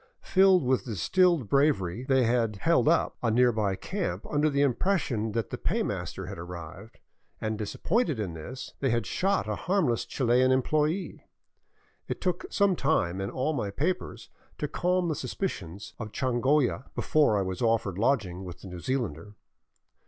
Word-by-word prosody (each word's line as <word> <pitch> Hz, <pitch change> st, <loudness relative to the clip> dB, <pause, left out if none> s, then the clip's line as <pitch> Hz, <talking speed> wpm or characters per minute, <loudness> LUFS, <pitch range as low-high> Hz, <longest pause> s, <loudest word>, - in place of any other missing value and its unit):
Filled 190 Hz, -3 st, +5 dB
with 130 Hz, 0 st, +1 dB
distilled 135 Hz, -, +2 dB
bravery, 125 Hz, -, +1 dB
they 130 Hz, -1 st, +3 dB
had 115 Hz, -2 st, +1 dB
" 100 Hz, -, -13 dB
held 165 Hz, -2 st, +3 dB
up 165 Hz, +2 st, +2 dB
" -, -, -52 dB
a 120 Hz, -, +1 dB
nearby 110 Hz, -4 st, +2 dB
camp 185 Hz, -, -4 dB
under 150 Hz, +1 st, +2 dB
the 140 Hz, -1 st, +2 dB
impression 130 Hz, -, 0 dB
that 115 Hz, -2 st, -2 dB
the -, -, -4 dB
pay -, -, 0 dB
master -, -, -4 dB
had -, -, -7 dB
arrived, 90 Hz, +5 st, -9 dB, 0.4 s
and 110 Hz, 0 st, -2 dB
disappointed 155 Hz, -, -1 dB
in 95 Hz, -6 st, -3 dB
this, 100 Hz, +12 st, -8 dB
they 135 Hz, -, +1 dB
had 115 Hz, -3 st, 0 dB
shot 190 Hz, -, 0 dB
a 105 Hz, -, -1 dB
harmless 160 Hz, -, 0 dB
Chilian 125 Hz, 0 st, +2 dB
employee. 150 Hz, +7 st, 0 dB, 0.8 s
It -, -, -4 dB
took 180 Hz, -2 st, -2 dB
some 200 Hz, -2 st, +3 dB
time 95 Hz, -, 0 dB
and 95 Hz, -, -3 dB
all 135 Hz, +5 st, -1 dB
my 115 Hz, -8 st, -2 dB
papers 165 Hz, -, -3 dB, 0.3 s
to -, -, -2 dB
calm 180 Hz, 0 st, 0 dB
the 160 Hz, -, 0 dB
suspicions 105 Hz, -, -5 dB
of 110 Hz, -2 st, -6 dB
Changolla 130 Hz, +2 st, +1 dB
before 145 Hz, -9 st, +3 dB
I 100 Hz, -, +1 dB
was 95 Hz, +2 st, -4 dB
offered 115 Hz, -5 st, +1 dB
lodging 105 Hz, -7 st, 0 dB
with 90 Hz, -1 st, -9 dB
the 95 Hz, -, -9 dB
New 90 Hz, -1 st, -7 dB
Zealander. 105 Hz, -, -3 dB
125 Hz, 165 wpm, -28 LUFS, 105-155 Hz, 0.8 s, Filled